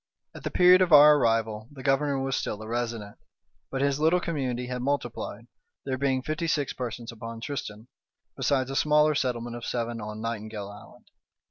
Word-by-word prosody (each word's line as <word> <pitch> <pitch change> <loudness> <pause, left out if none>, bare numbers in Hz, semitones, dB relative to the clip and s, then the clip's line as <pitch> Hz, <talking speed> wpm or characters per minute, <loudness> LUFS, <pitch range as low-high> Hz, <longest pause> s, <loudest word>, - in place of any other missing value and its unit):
At - - -11
the - - -2
period 180 +1 +6
of 180 -2 +2
our 150 0 +9
arrival 115 -3 0
the 135 -2 -11
governor 140 0 +1
was 135 -1 -1
still 105 - -3
a - - -9
resident, 115 -3 -4 0.5
but 135 - -3
his 140 0 +1
little 160 +4 +3
community 130 -8 -2
had 125 0 -4
multiplied, 120 -5 -3 0.4
there 135 -1 -1
being 130 -1 0
fifty 155 +3 -2
six 145 -4 0
persons 120 -1 -5
upon 115 0 -8
Tristan, 115 -4 -6 0.5
besides 135 -2 0
a - - -4
smaller 150 +1 +4
settlement 120 -4 -2
of 120 - -10
seven 120 -1 -3
on 105 0 -6
Nightingale 110 -2 -5
Island. 100 0 -14
125 Hz, 175 wpm, -27 LUFS, 115-145 Hz, 0.5 s, our